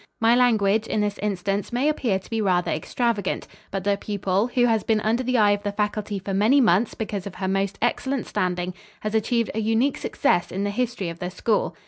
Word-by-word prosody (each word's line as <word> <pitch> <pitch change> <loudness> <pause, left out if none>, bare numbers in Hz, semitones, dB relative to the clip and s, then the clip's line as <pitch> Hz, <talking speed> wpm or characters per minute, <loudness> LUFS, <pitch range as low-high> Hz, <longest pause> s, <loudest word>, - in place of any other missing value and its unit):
My 225 +1 +4
language, 220 -3 +3
in 215 - 0
this 205 0 -2
instance, 200 0 -2
may 250 +4 +1
appear 250 -10 +1
to 190 - -13
be 225 -1 0
rather 180 -3 +1
extravagant, 205 +5 -1 0.2
but 195 -1 -3
the 200 0 +1
pupil, 200 +1 0
who 245 -1 +2
has 225 -2 +2
been 220 -1 +2
under 225 +4 +1
the 255 0 0
eye 210 -2 +5
of 205 0 0
the 205 - -2
faculty 210 0 -2
for 195 +1 -5
many 215 +9 +4
months 220 -2 +3
because 205 -3 -4
of 195 - -8
her 190 0 -3
most 195 +1 0
excellent 265 +1 0
standing, 180 -2 -2 0.3
has 215 0 -3
achieved 230 +1 +1
a 220 - -2
unique 225 +6 +1
success 175 -11 0
in 195 +2 -2
the 205 - -1
history 235 -5 -2
of 170 0 -8
the 180 - -3
school. 210 +4 0
210 Hz, 215 wpm, -24 LUFS, 195-230 Hz, 0.3 s, eye